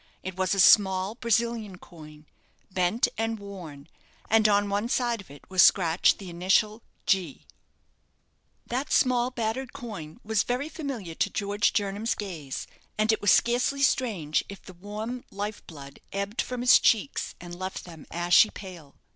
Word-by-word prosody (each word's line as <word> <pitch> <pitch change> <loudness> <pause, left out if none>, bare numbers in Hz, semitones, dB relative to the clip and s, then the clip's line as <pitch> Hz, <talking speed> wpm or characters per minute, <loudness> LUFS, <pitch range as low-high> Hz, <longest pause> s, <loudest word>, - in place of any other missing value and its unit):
It 185 -1 -5
was 190 +1 0
a - - -2
small 190 0 +5
Brazilian 230 -3 -1
coin, 155 -3 -14 0.5
bent 185 +5 +1
and 225 0 -1
worn, 175 -8 -10 0.4
and 220 -1 +5
on 205 0 +3
one 205 +3 -1
side 240 -3 0
of 190 - -18
it 140 0 -15
was 185 -1 +3
scratched 170 -2 +4
the 195 - -10
initial 195 +5 +1 0.2
"G." 185 -7 0 1.2
That 260 +3 -3
small 250 -1 +3
battered 245 +1 -3
coin 210 - -8
was 220 -1 +1
very 255 +5 -2
familiar 265 - -6
to 200 - 0
George 205 +1 0
Jernam's 205 +2 -1
gaze, 165 -10 -6 0.3
and 215 +1 +3
it 220 - -1
was 205 - +2
scarcely 250 +4 +2
strange 195 - +1
if 200 - -10
the 185 - -12
warm 215 +7 -6
life 205 +1 -5
blood 140 -4 -11
ebbed 200 +3 -2
from 250 -1 -5
his 250 - +7
cheeks, 230 +5 +1
and 175 0 -9
left 185 +2 -6
them 165 -4 -12
ashy 175 +5 +4
pale. 175 -8 -11
200 Hz, 155 wpm, -27 LUFS, 180-230 Hz, 1.2 s, his